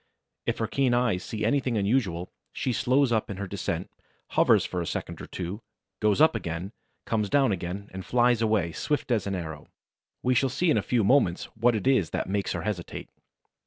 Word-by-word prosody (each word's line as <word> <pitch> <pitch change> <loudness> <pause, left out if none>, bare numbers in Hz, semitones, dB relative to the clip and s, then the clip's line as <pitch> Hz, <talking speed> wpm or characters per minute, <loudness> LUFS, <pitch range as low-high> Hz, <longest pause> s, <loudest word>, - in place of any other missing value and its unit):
If - - 0
her 115 - 0
keen 125 +2 +1
eyes 115 -7 +1
see 110 - -3
anything 130 -5 +1
unusual, 100 -5 0 0.2
she 125 - -2
slows 130 +2 +2
up 110 -2 +1
in 100 - -5
her 100 - -3
descent, 95 - -3 0.4
hovers - - +4
for 90 - -3
a 85 - -4
second - - -4
or - - -8
two, 95 +4 -5 0.4
goes 105 +2 +2
up 160 +1 +6
again, 90 -2 -4 0.3
comes 105 -3 0
down 135 -1 +3
again 95 +2 -4
and 95 0 -6
flies 120 0 +3
away, 105 -7 +2
swift 145 - -2
as 110 -4 +1
an 100 - -1
arrow. 80 -4 -6 0.6
We 125 - +3
shall 130 +2 +2
see 165 +6 +1
in - - +3
a - - 0
few 120 -3 +1
moments 100 -6 +2
what 115 +1 +3
it 105 - -3
is 130 -11 +3
that - - -2
makes 100 0 -1
her 85 - -3
hesitate. 100 -4 -4
105 Hz, 200 wpm, -27 LUFS, 95-125 Hz, 0.6 s, up